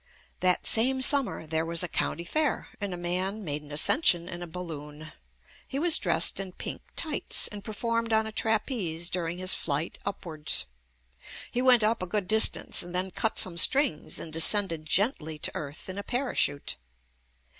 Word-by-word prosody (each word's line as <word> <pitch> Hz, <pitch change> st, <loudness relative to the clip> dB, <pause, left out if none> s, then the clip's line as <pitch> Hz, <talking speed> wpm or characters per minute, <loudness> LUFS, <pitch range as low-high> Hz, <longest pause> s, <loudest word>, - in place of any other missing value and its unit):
That 180 Hz, -1 st, +1 dB
same 260 Hz, +3 st, +5 dB
summer 275 Hz, -, +3 dB
there 160 Hz, 0 st, -2 dB
was 170 Hz, +1 st, -1 dB
a -, -, -2 dB
County 170 Hz, -, -2 dB
Fair, 300 Hz, -, -2 dB
and 200 Hz, -1 st, -3 dB
a 180 Hz, -, -6 dB
man 185 Hz, +4 st, -3 dB
made 150 Hz, -3 st, -4 dB
an 150 Hz, 0 st, -15 dB
ascension 175 Hz, -, +2 dB
in 175 Hz, -1 st, -8 dB
a 175 Hz, -, -7 dB
bal 180 Hz, +2 st, -8 dB
loon. 150 Hz, -1 st, -10 dB, 0.6 s
He 270 Hz, -, -6 dB
was 335 Hz, +2 st, +3 dB
dressed -, -, +3 dB
in 190 Hz, -2 st, -6 dB
pink -, -, -7 dB
tights 315 Hz, -2 st, +2 dB
and 205 Hz, -1 st, -10 dB
per 220 Hz, -, -7 dB
formed 230 Hz, +1 st, -3 dB
on 220 Hz, 0 st, +1 dB
a 220 Hz, -, -6 dB
trapeze 215 Hz, -, -2 dB
during 175 Hz, -1 st, -3 dB
his 185 Hz, 0 st, +2 dB
flight 150 Hz, +2 st, -4 dB
upwards. 155 Hz, -, 0 dB, 0.9 s
He 245 Hz, -, -2 dB
went 250 Hz, -3 st, +4 dB
up 220 Hz, 0 st, 0 dB
a 185 Hz, -, -4 dB
good 200 Hz, 0 st, -3 dB
distance, 220 Hz, +2 st, +4 dB
then 180 Hz, +2 st, -2 dB
cut 225 Hz, +5 st, -3 dB
some 170 Hz, -2 st, +1 dB
strings 265 Hz, -, +2 dB
and 160 Hz, -, -8 dB
descended 165 Hz, -1 st, +5 dB
gently 165 Hz, -, -1 dB
to -, -, -1 dB
earth 145 Hz, +1 st, -7 dB
in 190 Hz, +1 st, -7 dB
a -, -, -6 dB
parachute. 245 Hz, -, -2 dB
185 Hz, 175 wpm, -26 LUFS, 165-220 Hz, 0.9 s, same